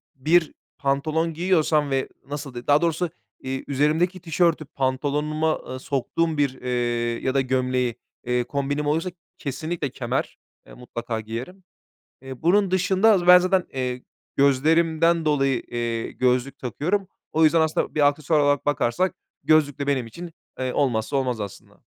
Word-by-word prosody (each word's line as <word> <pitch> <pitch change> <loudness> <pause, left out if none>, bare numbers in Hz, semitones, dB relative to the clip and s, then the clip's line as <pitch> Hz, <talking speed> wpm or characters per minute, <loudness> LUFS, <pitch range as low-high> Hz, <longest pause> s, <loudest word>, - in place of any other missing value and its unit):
bir 160 +5 +2 0.2
pantolon 155 +4 0
giyiyorsam 160 -4 +2
ve 135 -1 -1 0.2
nasıl 140 -2 -6
de 120 0 -8
daha 145 +1 +5
doğrusu, 170 +1 0 0.3
eee, 130 0 -4
üzerimdeki 155 +6 +1
tişörtü 165 -1 +1
pantolonuma 150 +4 -1
e 130 - -6
soktuğum 150 +5 -1
bir, 140 -3 0
eee, 125 - -4 0.6
ya 130 - +1
da 135 - +3
gömleği, 130 -2 0 0.3
eee, 125 0 +1
kombinim 140 +3 -2
olursa 160 +5 0 0.3
kesinlikle 150 +2 -3
kemer. 125 0 -3 0.3
Eee, - - -13
mutlaka 115 -2 -5
giyerim. 120 - -7 0.6
Eee, 130 -1 -9
bunun 190 +3 +3
dışında 190 +4 +3
az 180 -4 +2
ben 180 0 +10
zaten, 185 0 +1
eee, 125 -1 -3 0.3
gözlerimden 160 +4 +3
dolayı, 135 -4 +2
eee, 115 -1 -3
gözlük 130 +2 0
takıyorum. 180 - -1 0.3
O 160 - +3
yüzden 160 +1 +5
aslında 160 0 0
bir 145 -2 +5
aksesuar 150 +2 +1
olarak 145 -1 +2
bakarsak 145 +6 +1 0.3
gözlük 150 -3 +3
de 140 - -3
benim 130 -4 0
için, 170 +9 -9 0.3
eee, 130 -1 -2
olmazsa 125 -1 0
olmaz 125 -4 -1
aslında. 100 -2 -9
145 Hz, 145 wpm, -24 LUFS, 130-165 Hz, 0.6 s, ben